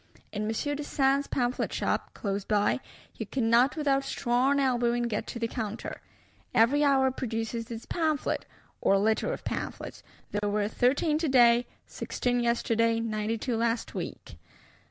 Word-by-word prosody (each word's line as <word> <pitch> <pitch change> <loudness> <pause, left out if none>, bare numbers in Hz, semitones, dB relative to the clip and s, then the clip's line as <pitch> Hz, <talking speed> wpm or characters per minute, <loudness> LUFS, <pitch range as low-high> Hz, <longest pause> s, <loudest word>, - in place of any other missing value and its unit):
In 210 0 -3
Monsieur 255 +7 -1
Dessein's 280 -1 +1
Pamphlet 245 -1 -1
shop, - - -2
close 200 -1 -2
by, 205 +4 +1 0.3
you - - -6
cannot 245 +2 +3
without 280 -3 +1
strong 265 +1 +1
elbowing 240 -3 +1
get 230 -3 -2
to - - -5
the 230 -1 -1
counter: 225 -2 -5 0.5
every 270 +7 +4
hour 270 -2 +4
produces 230 -2 -3
its 230 -1 -6
pamphlet, 315 -4 -1 0.3
or 195 - +4
litter 220 - +1
of - - -5
pamphlets; - - -5 0.3
"there 205 0 -1
were 205 0 +1
thirteen 285 +7 +2
today, 245 -6 +5 0.2
sixteen 245 0 -2
yesterday, 230 -1 +1
nine 220 0 -1
two 240 +1 -2
last 230 0 -1
week." - - -7
240 Hz, 140 wpm, -28 LUFS, 225-270 Hz, 0.5 s, today